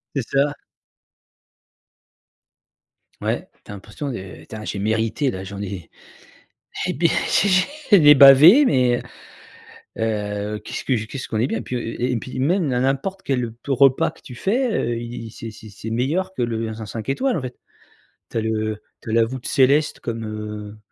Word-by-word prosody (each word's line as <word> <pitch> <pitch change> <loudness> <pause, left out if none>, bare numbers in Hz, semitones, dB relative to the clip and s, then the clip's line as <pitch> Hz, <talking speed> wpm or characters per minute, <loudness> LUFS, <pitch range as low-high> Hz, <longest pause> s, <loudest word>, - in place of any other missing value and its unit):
C'est 135 - 0
ça. 145 +1 +1 2.7
Ouais, - - -2 0.2
tu - - -11
as - - -6
l'impression 115 +8 -6
de 95 -5 -7
«Putain 110 +6 -9
j'ai 100 - -4
mérité 110 +6 0
là, 95 0 -6
j'en 100 +1 -7
ai 95 -4 -6 1.0
et - - 0
beh 165 +4 +2 0.2
j'ai 200 - +3
j'ai 185 +3 +3 0.3
j'en - - +3
ai 150 0 +10
bavé 145 - +9
mais 125 - +2 1.0
heu, 105 -1 -2
qu'est-ce - - -5
que 130 - +1
je 110 0 -4
qu'est-ce 130 +4 -7
qu'on 110 - -2
est 120 - +2
bien» 110 - -3
puis, 125 - -4
heu, - - -2 0.2
et 125 - +1
et - - 0
puis 130 +3 -5
même 170 +4 +2
na 125 -2 0
n'importe 135 +9 -1
quel 125 -4 -1
te 140 - -8
repas 135 +4 +4
que 165 - -21
tu 125 - -10
fais, 230 - 0
heu, 120 - -1
il 115 -1 -7
c'est 115 0 -8
c'est 110 0 -13
c'est 105 +2 -8
meilleur 165 +11 -1
que 125 - -2
le 115 -1 -1
dans 110 0 -6
un - - -6
5 110 +2 -7
étoiles 260 - 0
en - - -1
fait. 125 -1 -6 0.8
Tu - - -2
as - - +1
le 110 -1 -2 0.2
tu 110 - -7
as - - -2
la 115 0 +4
voûte 130 +2 -6
céleste 140 +3 +2
comme, 115 -1 -4
heu, 105 -1 -6
120 Hz, 190 wpm, -22 LUFS, 110-140 Hz, 2.7 s, ai